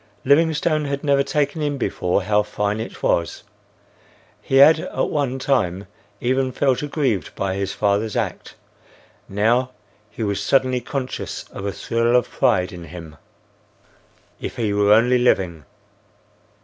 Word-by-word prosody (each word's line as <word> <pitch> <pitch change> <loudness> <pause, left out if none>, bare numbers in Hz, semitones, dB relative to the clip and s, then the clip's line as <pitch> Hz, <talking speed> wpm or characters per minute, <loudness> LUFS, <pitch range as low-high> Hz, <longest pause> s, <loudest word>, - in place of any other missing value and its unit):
Livingstone 155 +1 +2
had 140 0 -3
never 140 -2 +3
taken 150 +2 -1
in 145 -1 -1
before 95 -5 -1
how 105 +1 +2
fine 105 0 -2
it 110 - -7
was. 85 0 0 1.0
He 135 - -2
had 155 +4 +7
at - - -2
one 140 -4 -1
time 105 -9 0 0.3
even 130 +1 0
felt 130 -1 +1
aggrieved 140 - -2
by 95 -1 -2
his 100 0 -3
father's 105 +1 0
act; - - -3 0.7
now 115 +6 +1 0.4
he 115 - -6
was 100 -2 -1
suddenly 130 -2 +2
conscious 130 +1 -5
of 100 - -6
a - - -1
thrill 115 +3 0
of 125 - +3
pride 90 0 +1
in 85 -1 -9
him. 80 -1 -10 1.2
If - - -6
he 110 -4 -1
were 105 0 +3
only 120 +4 +5
living! 90 - +1
120 Hz, 140 wpm, -21 LUFS, 100-140 Hz, 1.2 s, had